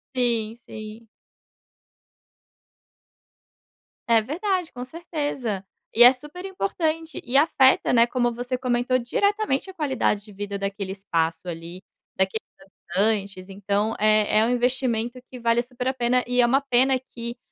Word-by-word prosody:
Sim, 230 -2 0
sim. 215 +1 -9 3.0
É 230 -1 +5
verdade, 360 - -2
com 245 0 -7
certeza. 280 - -4 0.3
E 240 - +7
é 245 - +10
super 295 +8 -10
importante, 325 - -2
e 250 +3 +1
afeta, 275 -3 +4
né, 235 0 +6
como 240 -1 0
você 245 +2 -3
comentou, 250 0 +1
diretamente 400 - 0
a - - -9
qualidade 265 - 0
de 210 - -14
vida 200 0 -5
daquele 195 -1 -3
espaço 165 -3 -2
ali, 170 +2 -7 0.4
daqueles 190 +3 0 0.5
habitantes, 200 -2 0
então 200 +2 -1
é 215 0 +3
é 220 - +4
um - - 0
investimento 245 -1 0
que 250 - -8
vale 235 0 +2
super 250 +1 -6
a 260 - +1
pena, 250 0 +1
e 245 0 0
é - - +5
uma 270 +4 +3
pena 260 0 +3
que 235 -2 -7
240 Hz, 140 wpm, -24 LUFS, 215-265 Hz, 3.0 s, é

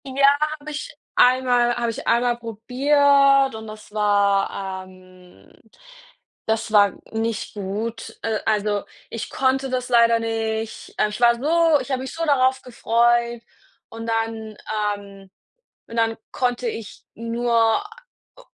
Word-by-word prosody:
Ja, 275 +1 +2 0.3
habe 300 +1 -8
ich 300 - -6 0.2
einmal 245 -1 +4
habe 235 -1 -1
ich - - -8
einmal 240 0 +2
probiert 275 +4 +3
und 220 0 -8
das 215 0 -11
war, 200 -2 +1
ähm 185 - -19 0.9
das 220 0 -1
war 205 -2 +5 0.2
nicht 225 0 -3
gut. 215 +3 -5
Äh, 220 -1 -1
also 210 -1 +1 0.3
ich 230 - -5
konnte 265 0 0
das 255 -1 -3
leider 235 -1 +5
nicht. 225 -1 -4
Äh, 215 - +2
ich 210 +3 -7
war 235 0 +6
so 320 +4 +3
ich - - -7
habe 260 -1 -1
mich 265 - -6
so 330 0 -2
darauf 260 -3 +2
gefreut 235 0 +1 0.5
und 225 0 -8
dann, 225 -1 -3 0.4
ähm 195 -1 -14 0.6
und 230 - -8
dann 225 -1 +1 0.2
konnte 245 -1 -1
ich 225 -2 -7
nur 230 - +1 0.5
äh, - - -14
230 Hz, 135 wpm, -22 LUFS, 215-255 Hz, 0.9 s, war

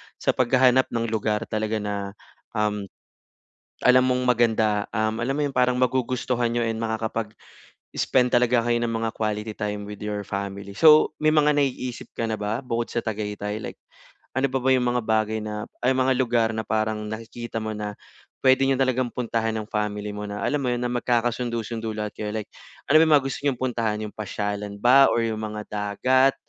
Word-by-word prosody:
sa - - +1
paghahanap 130 +1 +4
ng 115 -1 -2
lugar 110 0 0
talaga 110 0 -1
na, 100 -1 -4 0.4
um, 105 -1 -1 1.0
alam 125 0 +7
mong 125 0 +1
maganda, 110 -4 +2
um, 110 +1 0
alam 135 +4 -1
mo 150 - 0
yung 140 - -2
parang 125 0 +3
magugustuhan 125 -1 0
niyo 120 - +1
and 115 0 -2
makakapag 110 -1 -3 0.6
spend 125 -1 +1
talaga 120 -1 +3
kayo 120 0 +1
ng 120 0 -1
mga 115 0 -1
quality 105 0 -3
time 105 0 -3
with 105 0 -8
your 105 -1 -3
family. 100 0 -5
So, 155 +9 +6
may 155 0 +3
mga 150 -1 +5
naiisip 130 -4 -2
ka 115 - -1
na 110 - -3
ba 105 +5 -2
bukod 120 -2 -2
sa 120 - -3
Tagaytay 105 -1 -3
like 110 - -7 0.6
ano 135 - +2
pa 135 +1 -1
ba 130 - +3
yung 125 -1 +2
mga 120 0 +1
bagay 110 0 +1
na 105 0 -5 0.2
ay 125 - +4
mga 130 0 +3
lugar 120 -3 +2
na 110 - -2
parang 110 0 -1
nakikita 115 +1 -6
mo 110 0 -4
na 105 0 -4 0.5
puwede 130 -1 +5
niyo 135 - +3
talagang 130 -1 +1
puntahan 115 -2 -1
ng 110 -1 -4
family 105 -1 -2
mo 105 0 -5
na 105 0 -5
alam 145 - +1
mo - - -1
'yun 120 - -2
na 125 - 0
magkakasundo-sundo 120 -2 -1
lahat 105 -1 -3
kayo, 105 - -3
like 110 -2 -4 0.4
ano 155 - +8
ba - - +7
yung 155 - +4
mga 140 - +3
gusto 135 - -3
niyong 135 -4 0
puntahan, 115 -4 -1
'yong 105 - -7
pasyalan 105 -1 -4
ba 135 +4 +7
or 115 - +2
yung 110 -1 -2
mga 105 -1 -4
dagat 130 +6 +2
115 Hz, 195 wpm, -24 LUFS, 105-125 Hz, 1.0 s, ano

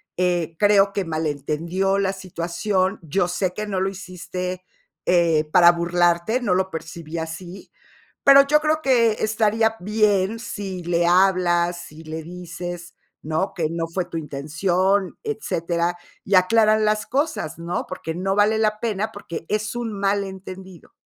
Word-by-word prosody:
eh, 175 -2 0
creo 200 0 +4
que 200 - -1
malentendió 165 +4 -1
la 195 -1 0
situación. 185 +2 -2
Yo 175 +3 0
sé 180 +1 -1
que 210 +2 -4
no 190 -2 -1
lo 190 - +1
hiciste, 185 -1 -6 0.4
eh, 170 -3 +3
para 175 0 +7
burlarte, 175 +5 +1
no 200 -8 +1
lo 190 0 0
percibí 165 0 -7
así, 170 +3 -7 0.5
pero 275 0 +8
yo 300 +1 +4
creo 310 +1 +1
que 240 -5 +4
estaría 220 +1 +1
bien 210 +1 +1
si 195 -5 -6
le 170 0 +1
hablas, 175 -1 +3
si 155 +1 -13
le 160 +1 -6
dices, 175 0 -7 0.3
¿no? 160 +6 -2
que 165 -3 -1
no 165 0 -2
fue 175 +1 -2
tu - - -10
intención, 175 +6 0
etcétera, 175 - -2 0.3
y 200 - +1
aclaran 215 +3 +4
las 215 0 0
cosas, 285 - -1
¿no? 170 +1 -3
Porque 165 -3 -5
no 190 +2 -1
vale 210 +2 +3
la 215 -1 +1
pena, 215 -2 -2
porque 170 -5 -7
es 210 +1 -1
un 240 -2 -3
malentendido". 190 -2 -4
185 Hz, 150 wpm, -22 LUFS, 170-205 Hz, 0.5 s, pero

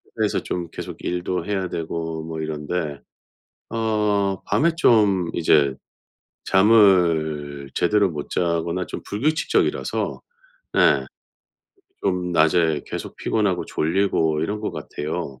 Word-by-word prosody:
그래서 - - +1
좀 85 -2 -4
계속 - - -7
일도 90 +1 -2
해야 95 -2 -1
되고 80 -1 -4
뭐 80 0 -6
이런데 75 -1 -3 0.7
어 105 -3 0
밤에 165 +2 +2
좀 100 - +3
이제 75 -5 +3 0.7
잠을 85 -9 +3
제대로 100 +1 +3
못 75 -3 -6
자거나 85 +1 -1
좀 - - -6
불규칙적이라서 150 +10 0 0.5
네 - - +4 1.0
좀 90 -1 0
낮에 80 -1 +3
계속 - - -6
피곤하고 100 -5 0
졸리고 80 -2 +1
이런 100 +6 -2
것 105 - -3
같아요. 75 -3 -5
90 Hz, 225 characters per minute, -22 LUFS, 80-100 Hz, 1.0 s, 네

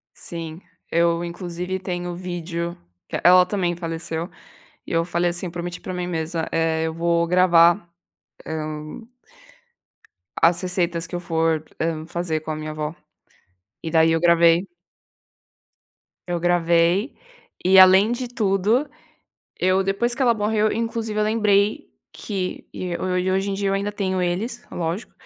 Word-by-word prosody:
Sim, 165 0 -7 0.3
eu 170 0 +2
inclusive 175 +1 -4
tenho 180 -2 -4
o - - -6
vídeo 170 -1 -4 0.3
que - - -3
ela 180 0 +7
também 180 -2 -1
faleceu 165 0 -4 0.6
e - - -11
eu 165 0 +2
falei, 175 0 0
assim, 175 +1 -4
prometi 175 +1 -6
pra 185 - -6
mim 180 0 -3
mesma, 160 -1 -2
eh, 165 0 0
eu 160 - -1
vou 170 0 +1
gravar, 175 0 +4 0.6
hum 155 +5 -6 1.3
as 170 +2 +4
receitas 175 -2 -1
que 175 - -6
eu - - -2
for, 165 -2 0 0.2
hum, 160 -1 -2
fazer 170 -2 -2
com 155 - -5
a 155 - -2
minha 155 0 -5
avó 155 +1 -4 0.9
e 165 - -4
daí 160 0 +4
eu 165 - +1
gravei. 170 +1 +4 1.6
Eu 175 -1 -1
gravei 175 - +2 0.5
e 190 +1 +5
além 190 +4 +7
de 245 +1 -3
tudo, 220 +4 +1 0.7
eu 185 +1 +2
depois 200 +5 0
que 265 - -2
ela 245 -2 +5
morreu 215 0 +1
eu - - -2
inclusive 225 -1 -2
eu 210 - +2
lembrei 210 - +2 0.2
que 190 -4 -4
e 180 -1 -5
e 185 +1 -1
hoje 195 +1 0
em 195 - -1
dia 200 0 -1
eu 195 - +1
ainda 200 +1 -1
tenho 190 -3 -1
eles, 200 +8 -2
lógico, 170 +5 -4
175 Hz, 150 wpm, -22 LUFS, 165-195 Hz, 1.6 s, ela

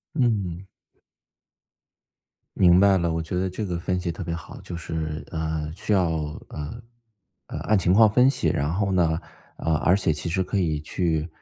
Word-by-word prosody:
嗯。 100 - 0 1.9
明 90 -1 +6
白 100 0 +5
了， 85 -2 0
我 80 - -1
觉 80 +2 -5
得 95 +1 0
这 105 +4 -4
个 90 -3 -3
分 90 +1 -1
析 85 -1 -2
特 80 - -6
别 85 - -3
好。 85 - -8
就 - - -7
是， 80 -1 -4
呃， 80 -2 -2
需 105 +2 -1
要， 90 -4 +3 0.4
呃， 75 +11 -6 0.7
呃， - - -5
按 110 - +2
情 90 -1 +2
况 110 +2 +7
分 125 +5 +5
析， 140 - 0
然 70 +2 0
后 100 +1 0
呢， 85 -3 +2 0.4
呃， 80 -1 0
而 90 - +3
且 95 -4 +1
其 75 +3 -3
实 95 +2 0
可 95 +3 -2
以 80 -5 0
去， 80 -1 -1
90 Hz, 195 characters per minute, -25 LUFS, 80-95 Hz, 1.9 s, 况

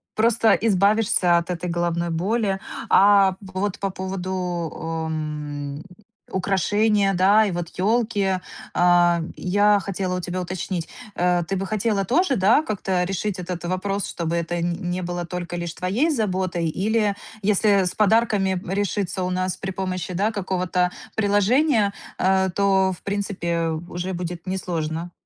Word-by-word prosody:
просто 225 -1 +4
избавишься 200 -3 +3
от 170 +1 -2
этой 180 0 -3
головной 170 0 -1
боли. 195 +4 0 0.3
А, 195 -1 +6
вот 190 0 -3
по 195 -1 -1
поводу 185 0 -4
у 165 -3 -3
м, 150 -2 -4 0.5
украшения, 200 +2 +1
да, 200 +4 +5
и 200 - -1
вот 175 -1 -4
ёлки, 200 -3 +1 0.3
а, 175 -1 +4 0.2
я 205 +2 +3
хотела 190 -2 -3
у - - -2
тебя 180 +1 -3
уточнить, 180 -1 -4 0.3
э, 175 0 +2
ты 195 - -1
бы 195 +1 -2
хотела 210 0 0
тоже, 275 - +2
да, 210 +9 +4
как-то 190 -6 -1
решить 195 +1 -2
этот 180 -1 -5
вопрос, 190 +2 -2
чтобы 170 0 -2
это 170 0 -2
н 175 +1 -2
не 180 +1 -2
было 175 0 -3
только 175 0 -5
лишь 170 -1 -4
твоей 205 - 0
заботой, 185 - -1
или 205 +4 0 0.3
если 200 -1 +3
с 180 - -3
подарками 210 -3 +2
решиться 195 -1 -1
у 180 - -1
нас 185 0 -1
при 190 - -5
помощи, 185 -1 -3
да, 200 +5 +1
какого-то 180 -3 -1 0.2
приложения, 215 +2 +3 0.2
э, 190 0 +2
то 190 -1 +3
в 180 - -9
принципе, 185 -5 -2 0.2
уже 175 +2 -4
будет 175 0 -5
несложно. 170 -2 -3
185 Hz, 145 wpm, -23 LUFS, 175-205 Hz, 0.5 s, А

